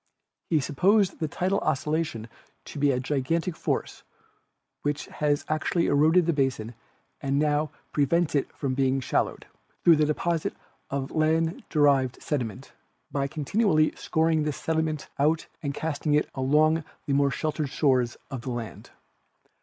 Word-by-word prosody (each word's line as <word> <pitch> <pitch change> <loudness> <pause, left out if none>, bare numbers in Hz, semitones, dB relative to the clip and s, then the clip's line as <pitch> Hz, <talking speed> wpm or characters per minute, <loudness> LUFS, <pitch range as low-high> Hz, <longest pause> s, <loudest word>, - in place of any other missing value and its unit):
He 160 - +3
supposed 190 +8 +2
the 160 - -1
tidal 185 +6 0
oscillation 150 -5 -1 0.4
to 145 - -8
be 145 0 +3
a 130 -2 +1
gigantic 150 +6 -1
force - - -2 0.8
which 145 0 -2 0.2
has 145 -1 +1
actually 155 +2 0
eroded 160 +5 +4
the 170 - +2
basin 130 -5 -1 0.5
and 140 0 0
now 150 +1 +1 0.2
pre 145 - +3
vents 170 +2 +1
it 140 - 0
from 135 -2 -1
being 135 0 +1
shallowed, 130 - -1 0.4
through 165 -2 +7
the 155 - +3
deposit 165 +2 -1 0.3
of 140 -1 -3
land 160 +1 +1
derived 140 -4 +3
sediment, 125 -3 -4 0.4
by 140 -1 0
continually 155 - +2
scouring 160 0 +1
this 150 -2 -2
sediment 160 -2 -1
out 155 +3 +2 0.2
and 140 -3 -3
casting 150 -1 -1
it 150 - +3
up - - -23
along 155 +4 +3 0.2
the 145 - 0
more 140 0 +3
sheltered 150 +2 -2
shores 130 -4 +1
of 130 -3 -4
the 130 - -6
land. 120 -2 -6
150 Hz, 150 wpm, -26 LUFS, 135-160 Hz, 0.8 s, through